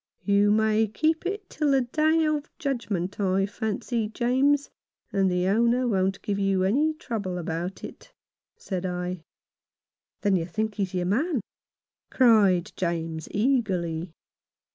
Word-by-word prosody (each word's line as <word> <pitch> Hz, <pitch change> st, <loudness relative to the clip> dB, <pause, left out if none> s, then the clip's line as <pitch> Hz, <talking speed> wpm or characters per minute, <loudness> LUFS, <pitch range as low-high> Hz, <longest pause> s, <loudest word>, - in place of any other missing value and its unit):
" -, -, -53 dB
"You 205 Hz, 0 st, +3 dB
may 220 Hz, +1 st, +3 dB
keep 315 Hz, -, 0 dB
it 400 Hz, +1 st, -4 dB
till 300 Hz, -2 st, -1 dB
the 270 Hz, -1 st, +4 dB
Day 315 Hz, +6 st, +2 dB
of 300 Hz, -1 st, -1 dB
Judgment, 210 Hz, -, -3 dB
I 195 Hz, -1 st, +2 dB
fancy, 220 Hz, +2 st, -2 dB
James, 265 Hz, +6 st, +1 dB, 0.4 s
and 195 Hz, -1 st, +2 dB
the 180 Hz, 0 st, 0 dB
owner 235 Hz, +5 st, +2 dB
won't 195 Hz, -3 st, 0 dB
give 200 Hz, -1 st, -1 dB
you 195 Hz, -1 st, +1 dB
any 290 Hz, +11 st, +2 dB
trouble 205 Hz, -10 st, -4 dB
about 170 Hz, +2 st, -4 dB
it," -, -, -10 dB, 0.5 s
said 185 Hz, -3 st, -4 dB
I. 180 Hz, -1 st, -3 dB, 0.5 s
" -, -, -62 dB
Then 200 Hz, -2 st, +2 dB
you 165 Hz, -2 st, -1 dB
think 215 Hz, +4 st, -2 dB
he 205 Hz, -, -4 dB
is 185 Hz, -1 st, -2 dB
your 180 Hz, -1 st, 0 dB
man? 260 Hz, -, 0 dB, 0.4 s
" -, -, -68 dB
cried 210 Hz, -8 st, +4 dB
James, 165 Hz, -3 st, -3 dB
eagerly. 190 Hz, -8 st, 0 dB
205 Hz, 150 wpm, -26 LUFS, 185-255 Hz, 0.5 s, the